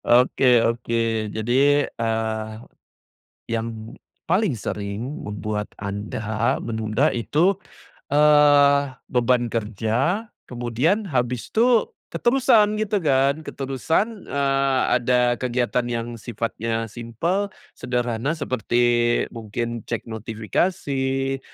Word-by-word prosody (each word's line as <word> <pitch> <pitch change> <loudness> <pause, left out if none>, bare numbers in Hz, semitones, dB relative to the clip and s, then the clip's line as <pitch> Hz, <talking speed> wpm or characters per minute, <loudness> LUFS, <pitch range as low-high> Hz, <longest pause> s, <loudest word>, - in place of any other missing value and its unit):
Oke 125 0 +4
oke. 115 -2 -1
Jadi, 135 +7 +2
eee, 110 -1 -2 0.9
yang 115 0 -4 0.3
paling 185 +2 +2
sering 105 +10 -5
membuat 105 0 -4
anda 105 +3 -2
menunda 110 +4 0
itu, 150 - +2 0.6
eee, 145 -1 +5 0.2
beban 125 -1 +2
kerja, 115 - -1 0.2
kemudian 125 - 0
habis 125 -5 -1
tuh 235 0 +3 0.2
keterusan, 235 -4 +3
gitu 215 -1 0
kan? 140 -2 +2
Keterusan, 160 - -2
eee, 135 -1 +1 0.2
ada 125 0 +2
kegiatan 125 -1 0
yang 120 -1 -2
sifatnya 115 0 -3
simpel, 145 - -2 0.3
sederhana, 125 +3 -1
seperti, 120 -3 +1
mungkin 115 +1 -4
cek 115 - -3
notifikasi, 135 - -1
120 Hz, 90 wpm, -23 LUFS, 115-145 Hz, 0.9 s, eee